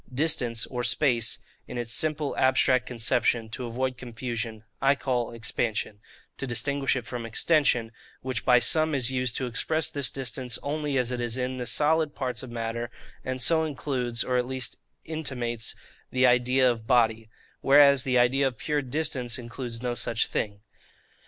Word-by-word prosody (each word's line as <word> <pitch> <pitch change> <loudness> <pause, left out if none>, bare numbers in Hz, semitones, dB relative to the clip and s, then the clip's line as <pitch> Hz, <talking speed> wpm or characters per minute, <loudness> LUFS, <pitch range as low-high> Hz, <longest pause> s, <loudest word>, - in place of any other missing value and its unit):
Distance 125 -5 +1
or 125 -1 -4
space, 120 -2 +2 0.3
in - - -6
its 120 -1 -3
simple 155 -1 0
abstract 130 -1 +3
conception, 115 -1 +1
to 120 +2 -5
avoid 130 +2 -2
confusion, 115 -2 -5 0.2
I 135 +1 +4
call 125 -4 -1
EXPANSION, 110 -2 -2 0.4
to 135 - -3
distinguish 140 +3 0
it 125 -3 -3
from 120 -1 -5
extension, 120 -1 +2 0.3
which 130 -2 -3
by 125 -1 +6
some 155 +5 +2
is 130 -2 0
used 125 -2 0
to 130 - -1
express 155 +6 0
this 140 -3 +2
distance 130 -2 -2
only 145 -1 -1
as 125 -1 0
it 125 -1 -2
is 120 0 -2
in 130 0 -2
the 125 -1 -4
solid 155 0 +2
parts 130 -2 -3
of 130 - -8
matter, 115 0 -4 0.3
and 130 0 -3
so 160 +3 +3
includes, 125 -5 -2
or 125 -1 0
at 125 0 0
least 130 -2 -3 0.3
intimates, 125 -8 -2 0.3
the 130 +1 +2
idea 125 +1 +4
of 115 -2 -7
body: 115 -3 +2 0.3
whereas 140 -1 +6
the 130 -3 +1
idea 130 +3 +3
of 125 -4 -5
pure 145 +7 -1
distance 130 -3 -2
includes 120 -1 -6
no 125 -1 -1
such 115 -1 0
thing. 100 -1 -3
125 Hz, 165 wpm, -27 LUFS, 120-135 Hz, 0.4 s, by